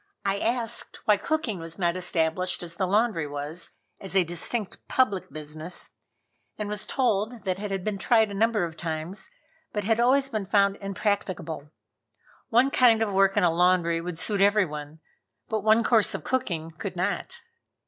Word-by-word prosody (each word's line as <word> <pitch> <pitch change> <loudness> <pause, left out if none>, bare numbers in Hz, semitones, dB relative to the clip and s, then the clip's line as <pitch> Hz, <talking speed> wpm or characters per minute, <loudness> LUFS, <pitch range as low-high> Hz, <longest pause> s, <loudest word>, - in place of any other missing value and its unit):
I 195 0 +1
asked 230 0 -2
why 210 -1 +5
cooking 250 - -1
was 165 0 -6
not 175 -2 +1
established 180 0 0
as 170 -1 -6
the 185 - -1
laundry 200 -5 +1
was, 145 +4 -4 0.3
as 195 0 -6
a 190 - +5
distinct 175 +5 -3
public 215 -8 +1
business, 155 +3 -5 0.7
and 210 - -3
was 210 -1 -1
told 230 -2 0
that 185 0 -1
it 210 0 -4
had 195 -2 -3
been 205 -1 -2
tried 220 +1 +3
a - - -5
number 215 0 +2
of 165 -2 -7
times, 165 - -4 0.4
but 210 - -2
had 225 +3 +2
always 265 +3 +4
been 215 -7 -3
found 200 0 +3
impracticable. 195 -6 -2 0.8
One 250 +4 +4
kind 230 -4 +5
of 205 -3 -2
work 195 +1 +3
in 205 - +4
a 170 -2 +4
laundry 170 -1 +3
would 175 -1 -5
suit 200 +4 -1
everyone, 160 -7 +1 0.5
but 220 -1 0
one 220 +2 +4
course 225 -4 +4
of - - -5
cooking 170 -11 -2
could 160 - -6
not. - - -2
195 Hz, 170 wpm, -26 LUFS, 170-220 Hz, 0.8 s, why